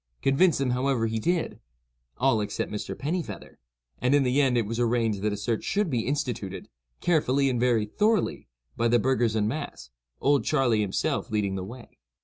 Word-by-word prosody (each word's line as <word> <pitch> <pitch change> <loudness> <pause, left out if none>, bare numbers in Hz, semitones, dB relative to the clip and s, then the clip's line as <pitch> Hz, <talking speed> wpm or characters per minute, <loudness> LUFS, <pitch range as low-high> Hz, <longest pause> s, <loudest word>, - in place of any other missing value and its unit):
Convince 155 +5 +4
them, 135 -2 0
however, 125 -2 +1
he 110 0 -1
did—all - - -2
except 105 - -3
Mr. 105 0 -5
Pennifeather, 150 - -4 0.4
and, 125 +3 +3
in 145 - +4
the 130 +3 +2
end, 130 -3 +2
it 115 - +1
was 115 +3 -4
arranged 115 -4 +1
that 105 +1 0
a 105 - -3
search 110 +2 -2
should 200 -5 0
be 120 -3 -1
instituted, 120 -9 -3 0.3
carefully 140 -5 +2
and 120 - -1
very 120 -3 +2
thoroughly, 210 - 0 0.3
by 115 - +1
the 120 +1 +4
burghers 120 -2 +1
en 105 -1 +1
masse, 115 - -5 0.3
"Old 140 0 +3
Charley" 125 -7 +2
himself 100 -2 -1
leading 105 -3 0
the 95 -1 -3
way. 120 +6 -11
120 Hz, 175 wpm, -27 LUFS, 105-135 Hz, 0.4 s, Convince